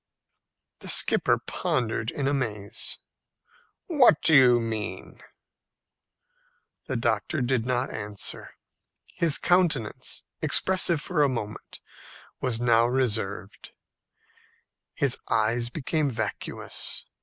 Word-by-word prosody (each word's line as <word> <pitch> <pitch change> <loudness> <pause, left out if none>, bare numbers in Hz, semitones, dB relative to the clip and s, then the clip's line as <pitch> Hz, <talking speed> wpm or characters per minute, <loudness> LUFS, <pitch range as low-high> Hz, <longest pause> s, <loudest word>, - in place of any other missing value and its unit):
The - - -10
skipper - - +3
pondered 110 -2 -2
in 140 +1 -2
amaze. 110 -8 -2 0.9
"What 270 - +5
do 160 - +4
you 125 -3 +7
mean?" 110 -2 -5 1.7
The 130 - -3
doctor 115 +4 -1
did 125 -2 0
not 125 0 -1
answer. 105 -1 -4 0.6
His 165 -4 +3
countenance, 165 - 0 0.2
expressive 180 -4 +2
for 170 -5 0
a 145 - +4
moment, 110 -5 -6 0.6
was 125 -3 0
now 120 -1 +4
reserved. 110 -6 -2 1.2
His 140 -3 +2
eyes 115 +2 +1
became 150 +2 -1
vacuous. 120 - -3
125 Hz, 95 wpm, -26 LUFS, 110-145 Hz, 1.7 s, you